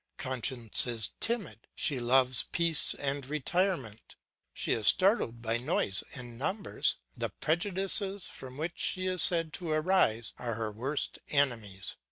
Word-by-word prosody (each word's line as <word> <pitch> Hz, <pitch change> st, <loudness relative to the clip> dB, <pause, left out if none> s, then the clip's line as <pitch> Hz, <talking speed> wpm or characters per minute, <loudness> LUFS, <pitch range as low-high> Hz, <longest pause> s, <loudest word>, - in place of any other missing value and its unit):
Conscience 125 Hz, -3 st, +1 dB
is 115 Hz, -4 st, 0 dB
timid, 225 Hz, -7 st, -3 dB
she 140 Hz, -4 st, +1 dB
loves 125 Hz, +1 st, +3 dB
peace 170 Hz, -2 st, +4 dB
and 140 Hz, 0 st, -2 dB
retirement; 150 Hz, -, -2 dB, 0.4 s
she -, -, -1 dB
is 110 Hz, -2 st, +1 dB
startled 185 Hz, -, +3 dB
by 115 Hz, 0 st, 0 dB
noise 120 Hz, -, -1 dB
and 120 Hz, -2 st, -8 dB
numbers; 190 Hz, +8 st, 0 dB, 0.2 s
the -, -, -3 dB
prejudices 190 Hz, +3 st, +1 dB
from 130 Hz, 0 st, -9 dB
which 165 Hz, +3 st, -5 dB
she 185 Hz, 0 st, 0 dB
is 185 Hz, -2 st, +1 dB
said 165 Hz, -3 st, +3 dB
to 175 Hz, -2 st, -5 dB
arise 155 Hz, -, +1 dB
are 120 Hz, -2 st, -3 dB
her 110 Hz, -1 st, -4 dB
worst 130 Hz, +8 st, -3 dB
enemies. 115 Hz, -9 st, -1 dB
140 Hz, 140 wpm, -30 LUFS, 120-175 Hz, 0.4 s, peace